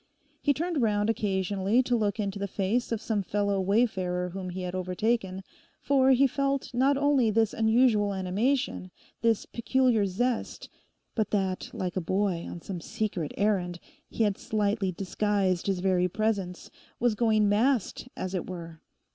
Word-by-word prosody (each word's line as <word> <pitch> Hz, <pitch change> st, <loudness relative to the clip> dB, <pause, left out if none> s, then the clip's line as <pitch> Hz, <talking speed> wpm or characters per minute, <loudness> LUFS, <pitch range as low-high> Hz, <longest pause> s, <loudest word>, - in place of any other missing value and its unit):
He 290 Hz, -, +3 dB
turned 325 Hz, +1 st, -1 dB
round 210 Hz, -1 st, +2 dB
occasionally 200 Hz, +2 st, +1 dB
to 245 Hz, -1 st, +1 dB
look 210 Hz, -2 st, 0 dB
into 200 Hz, -1 st, -2 dB
the 200 Hz, -, -2 dB
face 205 Hz, +6 st, -1 dB
of 230 Hz, -, 0 dB
some 220 Hz, -1 st, -1 dB
fellow 200 Hz, 0 st, 0 dB
wayfarer 185 Hz, -3 st, +1 dB
whom 185 Hz, 0 st, -6 dB
he 180 Hz, +1 st, -5 dB
had 180 Hz, 0 st, -4 dB
overtaken, 190 Hz, +1 st, -1 dB, 0.4 s
for 270 Hz, -2 st, +3 dB
he 265 Hz, +1 st, +5 dB
felt 275 Hz, 0 st, -1 dB
not 270 Hz, +3 st, +3 dB
only 280 Hz, -5 st, +3 dB
this 220 Hz, 0 st, +2 dB
unusual 220 Hz, -2 st, +3 dB
animation, 200 Hz, +4 st, -1 dB, 0.3 s
this 230 Hz, -2 st, +2 dB
peculiar 240 Hz, -3 st, +1 dB
zest, 240 Hz, +6 st, -2 dB, 0.4 s
but 215 Hz, -3 st, 0 dB
that, 190 Hz, -3 st, -1 dB
like 180 Hz, -2 st, -4 dB
a 185 Hz, -, 0 dB
boy 185 Hz, 0 st, -1 dB
on 170 Hz, -, -7 dB
some 180 Hz, -4 st, -5 dB
secret 205 Hz, -7 st, -3 dB
errand, 190 Hz, -4 st, +1 dB, 0.3 s
he 230 Hz, -, 0 dB
had 205 Hz, -2 st, 0 dB
slightly 205 Hz, -2 st, 0 dB
disguised 195 Hz, 0 st, 0 dB
his 190 Hz, -2 st, 0 dB
very 180 Hz, -1 st, +2 dB
presence, 200 Hz, -3 st, -2 dB, 0.3 s
was 240 Hz, -1 st, +2 dB
going 215 Hz, -1 st, +3 dB
masked, 230 Hz, +3 st, +1 dB
as 185 Hz, 0 st, -4 dB
it 185 Hz, -1 st, -3 dB
were. 165 Hz, -3 st, -8 dB
205 Hz, 155 wpm, -28 LUFS, 185-235 Hz, 0.4 s, he